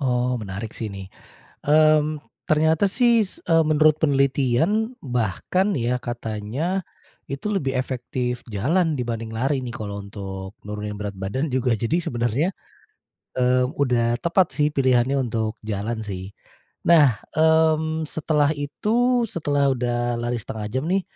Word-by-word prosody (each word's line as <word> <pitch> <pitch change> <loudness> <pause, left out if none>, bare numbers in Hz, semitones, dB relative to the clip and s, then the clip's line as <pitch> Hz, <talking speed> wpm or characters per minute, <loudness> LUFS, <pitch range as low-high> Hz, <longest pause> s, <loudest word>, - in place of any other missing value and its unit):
Oh, 125 -2 +1
menarik 105 +2 -5
sih 110 - -3
nih, 95 - -7 0.6
mmm, 155 0 +4 0.3
ternyata 160 +3 +3
sih 240 -2 +5 0.2
s - - -11
eee, 165 -1 +5
menurut 155 0 +5
penelitian, 140 +1 +2 0.4
bahkan 120 - 0 0.2
ya 120 - +1
katanya 115 +2 -4 0.7
itu 140 +9 -5
lebih 135 -9 0
efektif 125 -1 -3
jalan 160 - +2
dibanding 115 -2 -3
lari 135 +2 +1
nih, 120 - -4
kalau 100 -2 -5
untuk 95 -1 -7
menurunin 105 0 -5
berat 100 -1 -4
badan 130 +10 -1
juga, 130 -1 +1
jadi 130 +8 +1
sebenarnya, 120 +7 0 0.9
eee, 125 0 +3 0.2
udah 125 -3 +2 0.2
tepat 170 +1 +3
sih 150 0 +3
pilihannya 130 0 +3
untuk 110 -2 -1
jalan 110 +2 -2
sih. 95 -1 -4 0.6
Nah, 165 -3 +7 0.3
mmm, 160 0 +3
setelah 150 -2 +2
itu, 145 +7 -4 0.4
setelah 145 -3 0
udah 120 -1 -1 0.3
lari 120 0 -1
setengah 110 -2 -5
jam 130 +1 0
nih, 195 - +2
130 Hz, 135 wpm, -23 LUFS, 115-155 Hz, 0.9 s, Nah